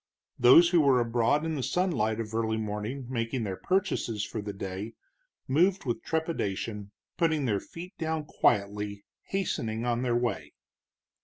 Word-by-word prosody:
Those 130 Hz, +8 st, +8 dB
who 175 Hz, -2 st, +4 dB
were 135 Hz, -3 st, +4 dB
abroad 120 Hz, +6 st, +1 dB
in 160 Hz, -, -1 dB
the 145 Hz, -, -2 dB
sunlight 125 Hz, -, 0 dB
of 110 Hz, -1 st, -5 dB
early 110 Hz, 0 st, 0 dB
morning 110 Hz, +5 st, -4 dB
making 115 Hz, 0 st, -2 dB
their 95 Hz, -3 st, -3 dB
purchases 120 Hz, -, -1 dB
for 110 Hz, -, -5 dB
the 105 Hz, 0 st, -5 dB
day, 100 Hz, +3 st, -6 dB, 0.5 s
moved 180 Hz, +7 st, +2 dB
with 120 Hz, -2 st, -2 dB
trepidation, 105 Hz, -, -2 dB, 0.3 s
putting 160 Hz, -4 st, +1 dB
their 105 Hz, -5 st, +1 dB
feet 180 Hz, -, -10 dB
down 160 Hz, -2 st, -2 dB
quietly, 100 Hz, -5 st, 0 dB, 0.2 s
hastening 115 Hz, -, -2 dB
on 120 Hz, 0 st, 0 dB
their 125 Hz, -2 st, +1 dB
way. 100 Hz, -12 st, -2 dB
120 Hz, 150 wpm, -28 LUFS, 105-160 Hz, 0.5 s, Those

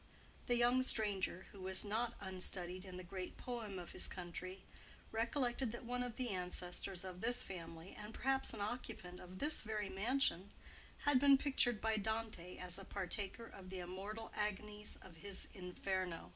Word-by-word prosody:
The 245 Hz, -, +4 dB
young 240 Hz, +2 st, +5 dB
stranger, 205 Hz, -7 st, +4 dB
who 200 Hz, -, -11 dB
was 190 Hz, +2 st, +3 dB
not 225 Hz, +3 st, +1 dB
unstudied 185 Hz, -1 st, 0 dB
in 185 Hz, -1 st, -7 dB
the 185 Hz, -, -5 dB
great 180 Hz, +1 st, -5 dB
poem 230 Hz, -6 st, -3 dB
of 175 Hz, -1 st, -6 dB
his -, -, 0 dB
country, 185 Hz, +1 st, -5 dB, 0.5 s
recollected 240 Hz, +1 st, +1 dB
that 240 Hz, -, -6 dB
one 250 Hz, +1 st, 0 dB
of 245 Hz, -2 st, -2 dB
the 250 Hz, -1 st, 0 dB
ancestors 180 Hz, 0 st, -2 dB
of 185 Hz, -1 st, -6 dB
this 240 Hz, +2 st, +3 dB
family, 165 Hz, -1 st, -7 dB
and 210 Hz, +1 st, -7 dB
perhaps 265 Hz, +3 st, +2 dB
an -, -, -4 dB
occupant 200 Hz, -5 st, -3 dB
of 180 Hz, +1 st, -9 dB
this 300 Hz, +8 st, +1 dB
very 215 Hz, -2 st, -1 dB
mansion, 205 Hz, -2 st, +2 dB, 0.5 s
had 290 Hz, -3 st, +5 dB
been 280 Hz, 0 st, +8 dB
pictured 260 Hz, -5 st, +3 dB
by 220 Hz, 0 st, +2 dB
Dante 215 Hz, -4 st, -2 dB
as 180 Hz, +1 st, -1 dB
a -, -, -7 dB
partaker 195 Hz, +5 st, -3 dB
of 190 Hz, -4 st, -10 dB
the 190 Hz, -, -4 dB
immortal 195 Hz, +5 st, -4 dB
agonies 210 Hz, 0 st, -2 dB
of 175 Hz, -3 st, -12 dB
his 195 Hz, +3 st, 0 dB
Inferno. 180 Hz, -, -2 dB
200 Hz, 170 wpm, -40 LUFS, 185-235 Hz, 0.5 s, been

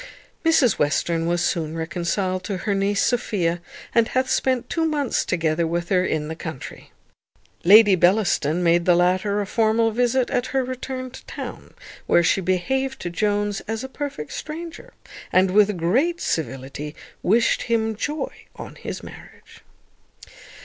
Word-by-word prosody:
Mrs 310 Hz, -9 st, +3 dB
Western 165 Hz, +3 st, +1 dB
was 175 Hz, 0 st, +1 dB
soon 160 Hz, -1 st, -2 dB
reconciled 180 Hz, +3 st, -2 dB
to 200 Hz, -3 st, -3 dB
her 205 Hz, -, +1 dB
niece 200 Hz, +1 st, +1 dB
Sophia, 180 Hz, -8 st, 0 dB, 0.3 s
and 230 Hz, -1 st, +4 dB
hath 260 Hz, +1 st, 0 dB
spent 255 Hz, -2 st, +1 dB
two 330 Hz, -, -1 dB
months 295 Hz, -5 st, 0 dB
together 165 Hz, -1 st, 0 dB
with 170 Hz, +1 st, -2 dB
her 185 Hz, -2 st, +3 dB
in 155 Hz, -4 st, -1 dB
the 160 Hz, -, -5 dB
country. 160 Hz, -5 st, -8 dB, 0.7 s
Lady 205 Hz, +2 st, +8 dB
Bellaston 180 Hz, -3 st, +2 dB
made 170 Hz, 0 st, +3 dB
the 175 Hz, -, +5 dB
latter 185 Hz, +4 st, +2 dB
a -, -, -2 dB
formal 225 Hz, +2 st, +2 dB
visit 245 Hz, +2 st, +1 dB
at 245 Hz, -, 0 dB
her 265 Hz, -1 st, 0 dB
return 255 Hz, 0 st, -5 dB
to -, -, -11 dB
town, -, -, -8 dB, 0.3 s
where 175 Hz, -, +4 dB
she 190 Hz, -, +2 dB
behaved 265 Hz, +10 st, -1 dB
to 175 Hz, -, -4 dB
Jones 205 Hz, +2 st, 0 dB
as 225 Hz, +2 st, -3 dB
a -, -, -4 dB
perfect 265 Hz, -, -6 dB
stranger, 335 Hz, +10 st, -7 dB, 0.4 s
and, 185 Hz, 0 st, +4 dB
with 210 Hz, 0 st, +4 dB
great 260 Hz, -, +1 dB
civility, 145 Hz, 0 st, -4 dB, 0.3 s
wished 230 Hz, +5 st, +2 dB
him 225 Hz, -1 st, +1 dB
joy 295 Hz, +5 st, -3 dB, 0.2 s
on -, -, -9 dB
his -, -, -6 dB
marriage. -, -, -14 dB
200 Hz, 150 wpm, -23 LUFS, 170-245 Hz, 0.7 s, Lady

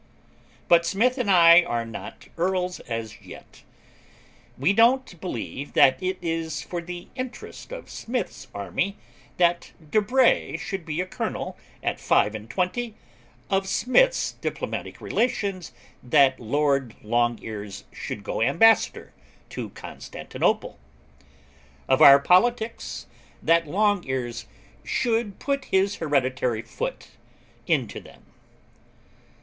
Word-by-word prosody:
But 170 Hz, 0 st, +6 dB
Smith 235 Hz, +9 st, +1 dB
and 235 Hz, -5 st, -1 dB
I 170 Hz, -2 st, +8 dB
are 120 Hz, -9 st, -2 dB
not 115 Hz, -, -9 dB
Earls 180 Hz, +1 st, -1 dB
as 115 Hz, -1 st, -5 dB
yet. -, -, -13 dB, 1.0 s
'We 145 Hz, +9 st, +2 dB
don't 230 Hz, -4 st, +3 dB
believe 140 Hz, -, -5 dB
that 130 Hz, -, +5 dB
it 185 Hz, 0 st, -1 dB
is 165 Hz, -3 st, -2 dB
for 175 Hz, +3 st, -5 dB
the 175 Hz, +1 st, -8 dB
interest 255 Hz, -, -7 dB
of -, -, -8 dB
Smith's 245 Hz, +1 st, -5 dB
army 100 Hz, -, -3 dB, 0.4 s
that 175 Hz, -1 st, +1 dB, 0.2 s
De 215 Hz, -, +4 dB
Bray 245 Hz, -6 st, +2 dB
should 190 Hz, -1 st, -5 dB
be 160 Hz, +2 st, -1 dB
a -, -, -2 dB
Colonel 185 Hz, -, -4 dB, 0.3 s
at -, -, -1 dB
five 105 Hz, -, +2 dB
and 110 Hz, 0 st, -8 dB
twenty, 210 Hz, -, -2 dB, 0.5 s
of 195 Hz, 0 st, 0 dB
Smith's -, -, +2 dB
diplomatic -, -, -5 dB
relations 195 Hz, -, -1 dB, 0.3 s
that 130 Hz, +1 st, +4 dB
Lord 135 Hz, 0 st, 0 dB
Longears 110 Hz, -3 st, -2 dB
should 100 Hz, -, -6 dB
go 105 Hz, -, -3 dB
Ambassador 175 Hz, -, +3 dB, 0.4 s
to -, -, -5 dB
Constantinople, -, -, -3 dB, 1.1 s
of 130 Hz, -, +3 dB
our 140 Hz, 0 st, +10 dB
politics, 225 Hz, -, +1 dB, 0.4 s
that 165 Hz, -1 st, +3 dB
Longears 135 Hz, -, -1 dB, 0.4 s
should 225 Hz, -4 st, -1 dB
put 275 Hz, -1 st, -2 dB
his 195 Hz, +1 st, +1 dB
hereditary 130 Hz, -6 st, 0 dB
foot 115 Hz, -, -5 dB, 0.6 s
into -, -, 0 dB
them. -, -, -17 dB
175 Hz, 115 wpm, -25 LUFS, 130-205 Hz, 1.1 s, our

